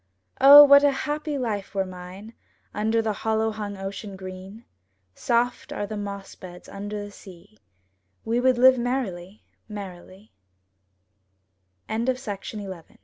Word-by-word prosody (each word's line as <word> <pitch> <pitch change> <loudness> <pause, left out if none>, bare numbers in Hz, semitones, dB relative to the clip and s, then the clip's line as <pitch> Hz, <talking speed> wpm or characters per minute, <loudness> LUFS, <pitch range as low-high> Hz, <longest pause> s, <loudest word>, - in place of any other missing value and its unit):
O, 285 +2 +11
what 280 0 +7
a 290 - +5
happy 295 +2 -3
life 210 -6 -4
were 195 -1 0
mine 185 +4 -10 0.4
Under 220 +2 0
the 220 -1 -1
hollow 220 +1 -1
hung 205 -2 -6
ocean 195 +1 -7
green! 190 +4 -10 0.5
Soft 240 - -1
are 205 - -3
the 215 +1 -6
moss 200 -1 -6
beds 180 -1 -12
under 205 +1 -6
the 205 - -11
sea; 175 - -16 0.7
We 230 +2 0
would 255 0 +2
live 260 +1 +6
merrily, 215 -7 -4 0.3
me 195 0 -10
210 Hz, 120 wpm, -24 LUFS, 195-240 Hz, 0.7 s, O